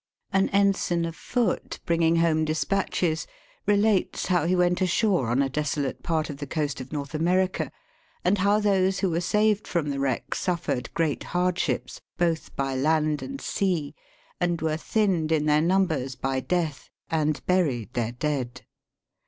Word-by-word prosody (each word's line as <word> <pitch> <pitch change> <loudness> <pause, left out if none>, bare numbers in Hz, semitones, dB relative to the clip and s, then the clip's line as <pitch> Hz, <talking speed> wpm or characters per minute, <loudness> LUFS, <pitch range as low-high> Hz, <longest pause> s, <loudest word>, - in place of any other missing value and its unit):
An 195 0 +3
ensign 195 -4 +2
of 165 0 -5
foot, 240 -1 -1
bringing 165 -1 +3
home 165 -1 +3
despatches, 160 0 0 0.4
relates 205 -1 +2
how 175 -3 +2
she 185 - +3
went 180 +1 +2
ashore 185 - +2
on 125 +4 +2
a - - +1
desolate 145 0 -2
part 160 -2 0
of 145 - -6
the 145 0 -6
coast 145 -2 -2
of 130 - -9
North 145 -1 -4
America, 180 +4 +1 0.6
and 190 +2 +3
how 200 +2 +3
those 195 -2 +2
who 190 -3 +1
were 165 +1 0
saved 210 +3 +2
from 165 -4 -1
the 140 - -3
wreck 135 -3 -1
su 180 - 0
tiered 130 -7 -3
great 160 -4 0
hardships, 180 0 -1 0.2
both 170 -2 -1
by 135 -1 -1
land 150 +2 +1
and 275 0 -6 0.9
and 175 -1 0
were 155 -1 +1
thinned 180 -4 0
in 155 -2 +2
their 150 0 +4
numbers 160 -7 +1
by 130 +1 -1
death, 160 -2 -2 0.2
and 155 -3 0
buried 140 - +1
their 120 -1 -1
dead. 125 -2 -3
165 Hz, 160 wpm, -26 LUFS, 145-185 Hz, 0.9 s, their